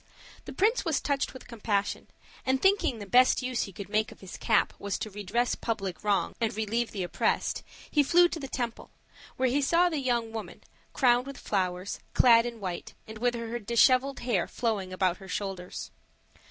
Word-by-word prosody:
The - - -7
prince 440 +5 +2
was 320 -6 +1
touched 280 -2 -1
with 260 - -12
compassion; 205 -3 -2 0.4
and 260 0 +1
thinking 385 - +3
the 205 - -7
best 255 +5 +4
use 255 -1 -1
he 195 - -10
could 195 +2 -8
make 215 +2 0
of - - -14
his 190 - -9
cap 220 -3 +2
was 200 -1 -2
to 215 - -5
redress 210 +5 -1
public 195 -7 -3
wrongs 205 -2 +1
and 220 -2 0
relieve 225 +2 0
the 195 -3 -4
oppressed, 175 - 0 0.3
he 295 - +4
flew 345 +5 +5
to 330 - -4
the 275 - -5
temple, 240 -3 -4 0.5
where 260 -1 +2
he 280 +4 +1
saw 340 +5 +4
the 315 -4 -2
young 240 -4 0
woman, 220 -1 -7 0.3
crowned 250 -1 +3
with 275 - -7
flowers, 185 -1 -2 0.2
clad 230 -1 +6
in 235 -1 -7
white, 180 -4 -5
and 220 0 -9
with 245 +1 +1
her 230 0 -4
disheveled 255 +5 +3
hair 240 0 0
flowing 210 -6 -2
about 185 -1 +1
her 195 - -12
shoulders. 190 -2 -5
230 Hz, 190 wpm, -28 LUFS, 200-260 Hz, 0.5 s, clad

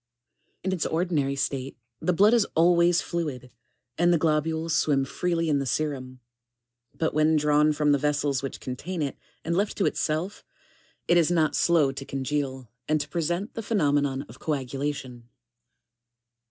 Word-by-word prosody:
] - - -47
27. - - -5
In - - +1
its 170 - -2
ordinary 160 -5 0
state, 135 -1 -3 0.2
the 180 - +1
blood 205 +6 +5
is 230 -4 +3
always 170 +1 +4
fluid, 140 -7 -4 0.5
and 175 +1 +4
the 170 - +4
globules 160 +1 0
swim 140 -3 +2
freely 165 +3 -1
in 145 -2 +2
the 135 - -2
serum; 130 -4 -3 0.8
but 160 - 0
when 155 +1 +3
drawn 150 0 +3
from 150 0 +2
the 140 - +3
vessels 145 -2 0
which 135 - -5
contain 155 +7 -4
it, 140 - -3 0.3
and 170 +1 0
left 200 +3 0
to 200 - +1
itself, 165 +6 -1 0.6
it 175 - +4
is 170 -2 +4
not 160 -3 +2
slow 160 -5 +3
to 135 0 -7
con 135 -1 -4
geal, 130 -3 -2 0.2
and 155 0 +3
to 145 0 -4
present 175 +6 -2
the 225 - -4
phenomenon 145 -10 +1
of - - -15
coagulation. 135 -4 -4
150 Hz, 165 wpm, -26 LUFS, 140-170 Hz, 0.8 s, blood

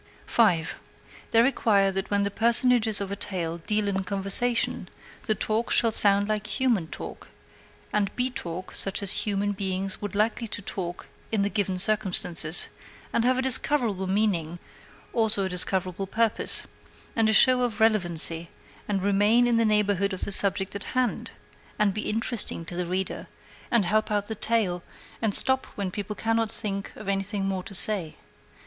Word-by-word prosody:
5. 175 -9 +1 0.5
They 230 0 +4
require 205 -6 +2
that 195 0 -4
when 200 0 +1
the 200 - -2
personages 235 -1 +3
of 200 -1 -5
a - - -2
tale 170 -4 -3
deal 210 +4 -1
in 195 -1 -1
conversation, 200 +5 +2 0.4
the 215 - +2
talk 220 +3 -2
shall 230 - +4
sound 200 -1 +6
like 215 0 -3
human 235 -11 +1
talk, - - -9 0.7
and 205 -2 +1
be 255 +1 -1
talk 180 -5 -7
such 195 +1 +1
as 200 +2 +1
human 205 0 -1
beings 190 -1 -3
would 205 -1 -5
be - - -3
likely 225 +2 0
to 205 - -5
talk 175 -2 -6 0.2
in 215 -3 +1
the 200 - -1
given 195 -3 -1
circumstances, 180 -5 +2 0.4
and 230 - +1
have 255 +1 +2
a 260 - 0
discoverable 245 -7 +2
meaning, 185 -5 -1 0.6
also 220 -3 +1
a 190 - -2
discoverable 185 +1 +1
purpose, 225 +2 0 0.5
and 225 -1 +2
a - - +3
show 250 +4 +5
of 240 -3 -2
relevancy, 170 -6 +1 0.4
and 195 -2 -2
remain 205 +4 +3
in 240 -1 +2
the 230 - +2
neighborhood 205 -2 +1
of 185 - -7
the - - -5
subject 195 0 +1
in 200 - -5
hand, 255 +1 -2 0.5
and 210 -3 +1
be 215 - -3
interesting 220 -5 -1
to 175 - -7
the 180 0 -3
reader, 185 +2 -4 0.4
and 235 -5 +2
help 215 +4 0
out 205 -1 -1
the 220 - -5
tale, 215 -5 -1 0.4
and 220 -3 0
stop 265 0 +1
when 200 -2 -3
the - - -11
people 205 +2 -5
cannot 225 0 -1
think 200 -3 -3
of - - -11
anything 195 0 -2
more 190 -1 -2
to 195 - -8
say. 185 -5 +5
205 Hz, 175 wpm, -25 LUFS, 190-220 Hz, 0.7 s, sound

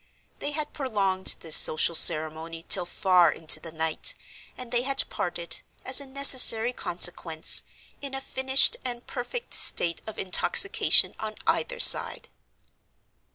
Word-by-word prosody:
They - - -5
had 300 0 -6
prolonged 200 -9 +1
this 160 -2 +1
social 155 +2 +3
ceremony 160 +1 +2
till 180 -3 +2
far 180 -4 0
into 160 - +1
the 165 - -11
night, 160 - -2 0.4
and 250 -2 -11
they 240 -1 -1
had 275 +2 -1
parted, 170 -1 -6 0.2
as 260 +2 +4
a 280 - -12
necessary 255 -4 +3
consequence, 170 -5 -1 0.4
in 275 -1 -7
a - - -5
finished 265 0 +1
and 245 -1 -7
perfect 370 - -8
state 170 -1 0
of 220 - -10
intoxication 390 - +2
on 215 0 -8
either - - -3
side. - - +2
220 Hz, 135 wpm, -23 LUFS, 170-265 Hz, 0.4 s, as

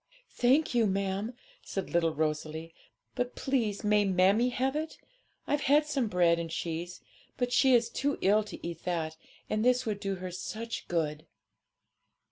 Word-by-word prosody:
'Thank 265 +6 +3
you, 235 -3 +3
ma'am,' 195 +4 -1 0.3
said 195 -2 -5
little 170 -1 +2
Rosalie; 155 +1 -2 0.4
'but 245 0 -2
please 230 -7 -1
may 210 0 +4
mammie 195 +5 +3
have 260 +2 -1
it? 315 +1 -3 0.5
I've 290 0 0
had 295 +2 +5
some 275 -5 0
bread 175 -4 +3
and 165 -1 -4
cheese; 170 +1 -4 0.4
but 245 -1 -1
she 260 0 +5
is 235 -1 +3
too 280 +4 -1
ill 210 +3 +4
to 205 - -7
eat 170 -1 -7
that, 165 -3 -1 0.3
and 215 0 0
this 250 +1 +3
would 210 -3 -2
do 195 -1 -2
her 185 0 -6
such 225 +6 -5
good.' 155 -2 -2
205 Hz, 160 wpm, -30 LUFS, 170-245 Hz, 0.5 s, had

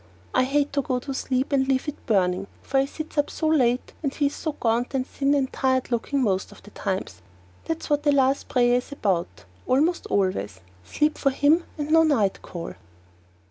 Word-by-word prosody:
I - - +3
hate 285 +2 0
to 280 - +2
go 260 -3 -1
to 270 +2 -5
sleep 260 +1 -1
and 265 -1 +2
leave 265 +2 +1
it 295 - -7
burning, 190 -2 +1 0.2
for 270 - +1
he 270 - +1
sits 310 +1 -5
up 290 - +1
so 320 - -4
late 255 -5 +2
and 280 -4 -1
he 290 - -1
is 280 - 0
so 315 - -3
gaunt 235 +1 0
and 260 -1 0
thin 280 +1 0
and 270 -2 0
tired 260 -1 0
looking 260 +3 0
most 190 -4 0 0.2
times. 185 - -4 0.4
That's 325 0 -3
what 295 -1 +1
the 295 -1 +3
last 270 -1 +2
prayer 245 -1 +3
is 250 - -5
about, 175 - -2 0.2
almost 310 +7 +2
always 105 - -1 0.2
sleep 300 - 0
for 275 - +3
him 290 +5 +3
and 295 0 -3
no 325 0 +7
night 250 -12 +2
call! 170 -2 -7
265 Hz, 195 wpm, -25 LUFS, 230-290 Hz, 0.4 s, no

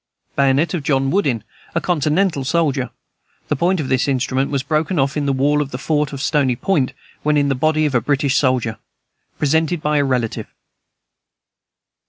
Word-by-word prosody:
Bayonet 140 +5 +2
of 175 - -1
John 135 -1 +1
Woodin, 140 - +1 0.3
a - - +3
continental 160 -1 +1
soldier. 140 -3 0 0.6
The 150 - +2
point 175 +5 +1
of 145 - -2
this 130 +1 +1
instrument 130 0 0
was 140 -2 -1
broken 160 +5 0
off 135 +1 +1
in 145 -2 -1
the - - +2
wall 145 +2 +2
of 140 - -3
the 125 - -5
fort 150 +1 0
at 140 - -6
Stony 135 -3 +1
Point, 145 -3 0 0.3
when 150 0 +2
in 140 -1 +2
the - - +2
body 155 +3 +1
of 145 - 0
a 125 - +3
British 140 +2 +1
soldier. 125 -5 +1 0.6
Presented 160 +3 +1
by 150 0 0
a - - +3
relative. 125 -4 -1
140 Hz, 180 wpm, -19 LUFS, 135-155 Hz, 0.6 s, a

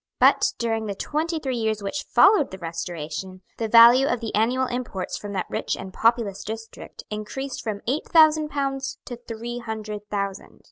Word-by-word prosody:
But, - - +4
during 225 -2 -1
the 200 - -3
twenty 320 - -2
three 265 -5 -3
years 220 -2 -1
which 290 +9 -3
followed 395 -6 +5
the 190 - -8
Restoration, 170 +1 -6 0.2
the 225 - -1
value 235 +4 +8
of 245 - 0
the 225 -1 -5
annual 245 +5 +2
imports 245 -7 -4
from 205 - -6
that 185 -2 -1
rich - - -2
and 190 0 -8
populous 225 -4 +1
district 225 +1 -8
increased 250 +6 -5
from 210 -2 -4
eight 270 +6 -1
thousand 310 -2 +5
pounds 275 -1 -2
to 245 - -6
three 240 0 -6
hundred 215 -2 -6
thousand. 200 -2 -4
225 Hz, 175 wpm, -24 LUFS, 205-265 Hz, 0.2 s, value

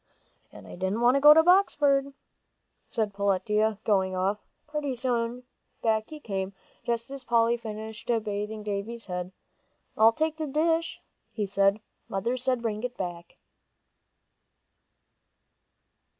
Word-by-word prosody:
"And - - -13
I - - -11
didn't 190 +5 -2
want 245 +1 +5
to 275 - +2
go 295 +1 +10
to 320 +1 +7
Boxford," 290 -7 +3 0.8
said 215 -4 -1
Peletiah, 210 +2 +1
going 190 -3 +2
off. 195 +3 0 0.3
Pretty 300 -3 -3
soon, 245 0 -1 0.4
back 220 -1 +1
he 310 - -8
came, 195 -6 -4 0.3
just 235 +2 -2
as 275 -1 -7
Polly 235 -1 +3
finished 220 -1 -7 0.2
bathing 210 +1 -4
Davie's 210 +3 -4
head. 180 -1 -4 0.6
"I'll 220 +1 +6
take 315 +5 -1
the 310 -1 -3
dish," 325 +3 0 0.3
he 210 - -1
said. 200 +1 +2 0.3
"Mother 230 +6 -1
said 255 -1 -1
bring 215 -2 -2
it 245 0 -5
back." 175 -2 -6
225 Hz, 130 wpm, -27 LUFS, 200-260 Hz, 0.8 s, go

